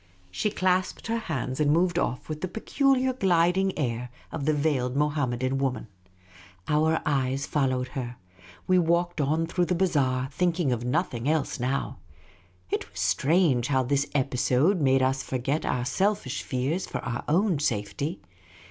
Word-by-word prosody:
She 210 - 0
clasped 185 -1 0
her 230 0 -1
hands 130 - -3
and 150 -1 +3
moved 175 +2 +2
off 125 -7 -2
with 155 0 -5
the 185 - -1
peculiar 260 +6 +1
gliding 190 -3 +2
air 125 -4 -2 0.2
of 150 -4 -4
the 155 - +3
veiled 140 -4 0
Mohammedan 135 -3 0
woman. 130 -4 -2 0.8
Our 155 +1 +3
e> - - 0 0.4
js 135 0 -3
followed 130 -3 0
her. 125 -3 -5 0.5
We 185 0 +4
walked 170 -1 +1
on 155 +4 +1
through 175 +2 0
the 180 - 0
bazaai^ 140 -7 +1
thinking 170 -2 +1
of 120 -1 -1
nothing 125 -1 -1
else 155 -3 0
now. 130 +3 -2 0.7
It - - -2
was - - -9
strange 145 -5 +2
how 130 -2 +2
this 140 +3 0
episode 135 +6 +2
made 135 -1 +3
us 130 +1 +1
forget 135 +5 -2
our 125 -1 0
selfish 180 -2 0
fears 140 +8 -2
for - - -4
our 120 -1 -3
own 175 +1 +2
safety. 120 - -2
145 Hz, 155 wpm, -27 LUFS, 130-175 Hz, 0.8 s, We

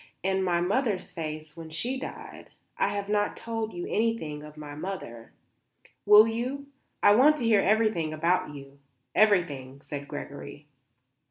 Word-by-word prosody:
And 190 0 +1
my 175 -2 +1
mother's 205 0 0
face 155 -2 -6
when 165 -1 -9
she 235 +12 -2
died. - - -9 0.3
I - - +1
have 200 -1 -3
not 205 0 0
told 225 -1 -4
you 175 0 -5
anything 215 -10 -1
of 150 0 -12
my 150 -1 -8
mother." 145 -9 -7 0.8
"Will 210 +1 +9
you? 250 +5 -3 0.4
I 205 - +8
want 290 +7 +6
to 255 - -4
hear 220 -3 +5
everything 210 -6 +2
about 160 -1 0
you; 140 0 -12 0.3
everything," 145 -11 +2
said 145 -2 -7
Gregory. 145 0 -8
180 Hz, 150 wpm, -28 LUFS, 150-215 Hz, 0.8 s, Will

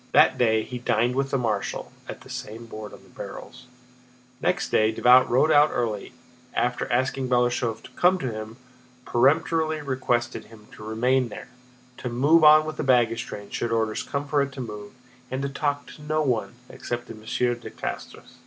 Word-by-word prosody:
That - - +5
day 110 -3 +3
he 125 - -6
dined 120 +1 +1
with 135 +1 -1
the 135 - +1
marshal, 110 -5 -2 0.2
at - - -7
the - - -15
same 115 +2 -7
board 110 -2 -8
on - - -14
the - - -20
barrels. - - -10 0.7
Next 180 +2 0
day 110 0 +3
Davout 125 +3 +5
rode 135 +6 +3
out 150 0 +6
early 110 -4 -2
and, - - -18 0.4
after 125 0 -1
asking 130 +1 0
Balashëv 120 -2 +1
to - - -13
come 180 +1 +3
to 130 -8 -3
him, 110 +1 -7 0.5
peremptorily 155 +5 +2
requested 130 -3 -1
him 110 -2 -16
to - - -12
remain 120 +3 +1
there, 120 - -9 0.5
to 125 - -4
move 145 +7 +4
on 155 0 +8
with 155 0 -5
the - - -2
baggage 120 -3 +2
train 100 0 -8
should 120 - -2
orders 110 -1 0
come 140 0 -4
for 145 0 +2
it 140 0 -2
to 135 - -9
move, 105 -4 -7 0.4
and 130 +1 -3
to 140 - -1
talk 145 +1 -2
to - - -13
no 155 +1 0
one 120 -4 -1
except 120 -1 -5
Monsieur 115 +2 -1
de 120 0 -9
Castrès. - - -7
125 Hz, 190 wpm, -25 LUFS, 115-140 Hz, 0.7 s, on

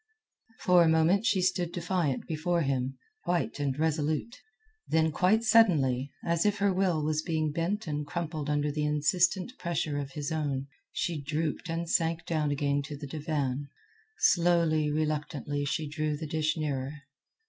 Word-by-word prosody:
For 180 -1 +5
a 170 - +5
moment 165 +7 +3
she 185 -2 +2
stood 180 -2 +1
defiant 175 -6 -1
before 170 +1 0
him, 135 -1 -1 0.3
white 175 -4 -1
and 140 -2 -1
resolute. 155 +7 0 0.5
Then 160 0 +2
quite 195 +8 +3
suddenly, 150 - +4
as 170 -1 +1
if 210 0 +2
her 200 -1 +2
will 180 -5 +1
was 155 0 0
being 155 -2 -1
bent 175 +7 -1
and 150 -2 -2
crumpled 155 -1 -4
under 145 0 +1
the 150 +1 -2
insistent 175 - +1
pressure 160 -4 -1
of 140 -1 -6
his 150 +1 -4
own, 145 -4 -1 0.3
she 165 -4 -2
drooped 155 +3 -2
and 165 +1 -2
sank 165 0 +1
down 155 -3 0
again 145 0 0
to 150 -1 -7
the 145 - -7
divan. 145 -2 -2 0.5
Slowly, 170 -4 +3
reluctantly 150 -1 -2
she 155 +2 -1
drew 150 0 -2
the 160 - -5
dish 155 +1 0
nearer. 140 -3 -2
155 Hz, 160 wpm, -29 LUFS, 145-170 Hz, 0.5 s, For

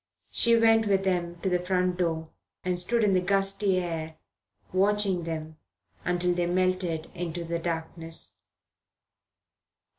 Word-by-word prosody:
She 235 0 +5
went 225 -1 +4
with 195 -1 +2
them 175 -2 -1
to 190 - 0
the 180 -1 0
front 180 -1 +1
door, 160 -3 -1 0.3
and 180 -1 +1
stood 230 +6 +2
in 205 -2 +3
the 185 - +3
gusty 195 +1 +2
air 165 -3 -3 0.6
watching 195 -2 +2
them 160 -1 -5 0.5
until 180 0 +1
they 175 0 0
melted 180 -2 0
into 175 -1 -4
the 170 0 -3
darkness. 165 0 -4
180 Hz, 130 wpm, -27 LUFS, 170-195 Hz, 0.6 s, She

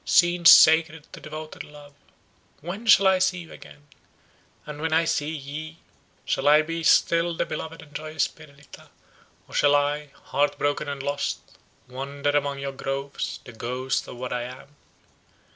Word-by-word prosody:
scenes 175 -1 +5
sacred 160 -1 +6
to - - -9
devoted 155 0 -8
love, 145 -1 -15 0.7
when 190 +9 -7
shall 200 -2 +7
I 190 -1 +4
see 185 0 +1
you 165 - -13
again! 75 0 -14 0.8
and 150 0 -8
when 160 0 -1
I 165 +1 +3
see 150 -2 -1
ye, 155 +1 -7 0.5
shall - - -1
I 150 +1 +6
be 165 +1 -4
still 170 +1 +3
the - - 0
beloved 160 +1 -7
and 150 -2 -19
joyous 155 +1 -2
Perdita, 140 -3 -16 0.6
or - - -16
shall 145 0 +4
I, 145 +1 0 0.2
heart 145 +1 0
broken 145 0 -1
and 140 -1 -5
lost, 145 0 -4 0.3
wander 140 +3 -3
among 145 -1 0
your 140 0 -4
groves, 135 +1 -4
the 120 - -11
ghost 125 +3 -3
of - - -9
what 125 0 -5
I 125 - -2
am!" 130 +3 -12
145 Hz, 160 wpm, -24 LUFS, 140-160 Hz, 0.8 s, shall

